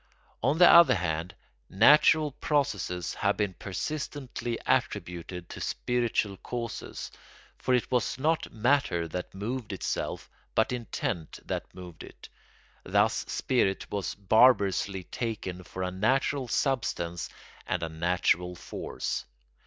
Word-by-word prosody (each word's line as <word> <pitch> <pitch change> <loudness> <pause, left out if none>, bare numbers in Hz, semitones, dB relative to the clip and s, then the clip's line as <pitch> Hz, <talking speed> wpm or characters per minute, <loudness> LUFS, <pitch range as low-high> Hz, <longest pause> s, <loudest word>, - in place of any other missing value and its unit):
On 140 +6 +2
the 175 0 +8
other 170 -7 +8
hand, 85 0 -2 0.3
natural 150 +8 +6
processes 130 - -1
have 100 0 0
been 105 -3 0
persistently 125 - -4
attributed 90 -7 -1
to - - -8
spiritual 120 -5 0
causes, 120 +1 -5 0.5
for 125 - +2
it 125 - -1
was 125 -1 +1
not 155 +4 0
matter 115 -8 +1
that 90 +3 -6
moved 110 +3 -4
itself 95 - -3 0.3
but 110 - +3
intent 110 -9 -3
that - - -4
moved 90 -3 -10
it. - - -13 0.5
Thus - - +3
spirit 100 -7 0
was 100 -2 -2
barbarously 100 -2 +3
taken 100 -5 -4
for 95 +1 -6
a 90 - -2
natural 130 +7 +1
substance 100 - -1 0.4
and - - -1
a 80 - -2
natural 90 +2 +1
force. - - -4
105 Hz, 120 wpm, -28 LUFS, 90-130 Hz, 0.5 s, the